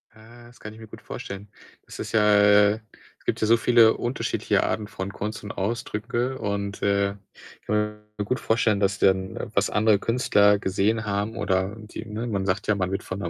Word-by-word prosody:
Äh, 120 +2 -16
das 120 - -19
kann 105 0 -9
ich 110 - -14
mir 110 - -11
gut - - -12
vorstellen. 100 +1 -8 0.4
Das - - -11
ist - - -5
ja 110 - +4 0.2
äh, 105 +1 +5 0.4
es - - -28
gibt - - -1
ja 110 - +2
so 115 +1 +5
viele 115 -1 +5
unterschiedliche 120 +2 -1
Arten 105 -1 -2
von 95 0 -6
Kunst 105 +1 -5
und 105 - -6
Ausdrücke 120 +4 -3
und, 100 -1 -3
äh, 100 0 +2 0.5
ich - - -33
kann 105 - +1 0.4
mir 105 - -2
gut 125 +5 -1
vorstellen, 110 -2 +1
dass 100 -1 +1
dann, 95 +1 0
was 100 0 +2
andere 105 -1 +3
Künstler 105 -3 +3
gesehen 100 +3 0
haben 105 +3 -2
oder 95 -1 0
die 110 +1 -9
ne, 110 +2 -5
man 100 -4 -2
sagt 95 +2 -1
ja, 105 - +3
man 95 -2 -2
wird 95 - -3
von 95 - -6
'ner 85 -4 -3
105 Hz, 210 wpm, -25 LUFS, 100-110 Hz, 0.5 s, äh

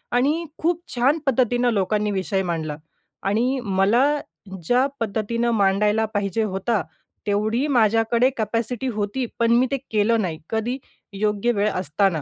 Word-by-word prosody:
आणि 300 +7 +2
खूप 340 +1 0
छान 270 +6 +3
पद्धतीनं 245 -2 +2
लोकांनी 210 +1 0
विषय 190 0 -1
मांडला 160 -4 -3 0.5
आणि 240 +7 +1
मला 200 +6 +3 0.6
ज्या 250 +2 +4
पद्धतीनं 230 +2 -1
मांडायला 210 +2 +2
पाहिजे 205 +2 0
होता 200 +1 0 0.5
तेवढी 215 +6 +1
माझ्याकडे 230 0 +3
कॅपॅसिटी 230 +4 -2
होती, 210 +5 -2
पण 230 0 +3
मी 250 +2 +4
ते 275 - +1
केलं 220 +1 +2
नाही 165 -4 -3
कधी? 230 +4 -1 0.4
योग्य 210 +3 0
वेळ 205 +1 +2
असताना. 180 -1 0
220 Hz, 135 wpm, -23 LUFS, 200-245 Hz, 0.6 s, ज्या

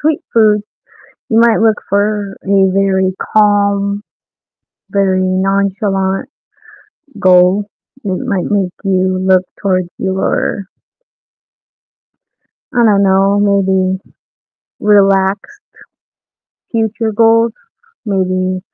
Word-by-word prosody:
sweet 305 0 0
food, 215 -2 +3 0.7
you 225 - +3
might 230 -1 +4
look 220 -1 +2
for 205 0 -1
a 195 -1 +2
very 190 -1 +1 0.2
calm, 200 -1 +2 0.9
very 190 -2 +1
nonchalant 195 +3 -1 0.9
goal 185 +2 +3 0.4
that 190 -2 -2
might 200 -7 -2
make 195 -3 0
you 185 -1 0
look 185 0 +2 0.2
towards 185 -3 0
your 190 +1 -2 2.1
I 240 -1 +3
don't 200 -2 +3
know, 195 +1 +2
maybe 190 -2 +1 0.8
relaxed 200 - +1 1.1
future 225 0 -1
goals, 230 +1 +3 0.5
maybe 185 -3 -1
195 Hz, 85 wpm, -14 LUFS, 190-210 Hz, 2.1 s, might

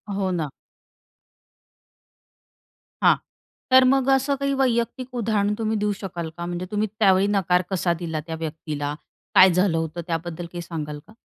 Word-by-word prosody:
हो, 195 -1 0
ना. 165 -5 -2 2.5
हां. - - +7 0.6
तर 260 0 +8
मग 265 0 +3
असं 270 +1 +3
काही 275 0 0
वैयक्तिक 245 0 0
उदाहरण 210 -3 +1
तुम्ही 220 -1 -1
देऊ 210 0 0
शकाल 175 -4 -5
का? 170 - -4
म्हणजे 175 +1 -4
तुम्ही 210 +1 0
त्यावेळी 195 -2 +4
नकार 180 -1 +2
कसा 180 -2 +1
दिला 160 -2 -3
त्या 165 - -4
व्यक्तीला? 150 -2 -4 0.4
काय 190 - +9
झालं 180 -2 +2
होतं 160 +1 -3
त्याबद्दल 170 0 -3
काही 175 - -5
सांगाल 150 -3 -5
का? - - -16
185 Hz, 150 wpm, -24 LUFS, 165-220 Hz, 2.5 s, काय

